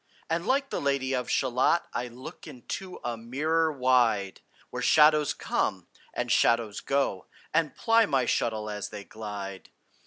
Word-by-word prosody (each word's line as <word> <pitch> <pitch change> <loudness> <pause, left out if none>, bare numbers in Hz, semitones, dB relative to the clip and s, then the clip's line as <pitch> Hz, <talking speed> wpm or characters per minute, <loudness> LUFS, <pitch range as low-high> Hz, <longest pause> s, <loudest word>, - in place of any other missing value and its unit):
And 170 +4 -1
like 275 +1 +1
the - - -2
Lady 140 -1 0
of 125 -1 -2
Shalott 130 +6 +2
I 125 - -2
look 125 +2 -10
into 180 +9 -7
a 120 -1 -2
mirror 155 +8 0
wide, 125 -8 +2 0.3
Where - - -4
shadows 150 -1 +5
come, - - -1 0.3
and - - -3
shadows 115 -3 +2
go, 135 -9 -1 0.3
And 160 -3 +1
ply 225 -1 +3
my 135 -4 +1
shuttle 110 -3 0
as 105 -1 -4
they 105 -1 -8
glide. 100 -2 -7
130 Hz, 150 wpm, -28 LUFS, 110-155 Hz, 0.3 s, shadows